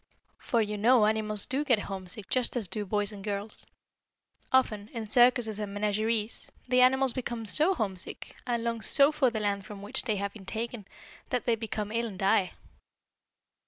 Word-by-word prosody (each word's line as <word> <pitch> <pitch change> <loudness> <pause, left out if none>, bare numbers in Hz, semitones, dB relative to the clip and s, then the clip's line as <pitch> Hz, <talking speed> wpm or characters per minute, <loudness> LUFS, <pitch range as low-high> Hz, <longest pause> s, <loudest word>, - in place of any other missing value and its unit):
For 230 -2 +1
you 210 0 -4
know 235 +1 +5
animals 215 -1 +2
do 275 +3 -1
get 255 -6 +3
homesick 190 +1 -5
just 255 -1 0
as 220 -5 +1
do 205 +3 -3
boys 205 +1 0
and 200 -2 -9
girls. 205 +1 -4 0.8
Often, 215 -6 +2
in 230 -2 -4
circuses 240 -1 +4
and 210 -2 -4
menageries, 215 +2 -1 0.2
the 250 0 +3
animals 265 0 +4
become 240 -3 -4
so 310 - +3
homesick, 195 - -5
and 235 -2 -1
long 230 -1 -2
so 280 +8 +5
for 300 -4 +2
the 225 -2 -3
land 200 -1 -1
from 200 0 -10
which 205 - +1
they 220 -4 -1
have 200 0 -3
been 195 -4 -13
taken, 225 -1 -5 0.4
that 250 - -1
they 235 - +2
become 215 -2 -4
ill 230 +1 -1
and 200 -4 -8
die. 195 -1 +2
220 Hz, 180 wpm, -29 LUFS, 205-240 Hz, 0.8 s, know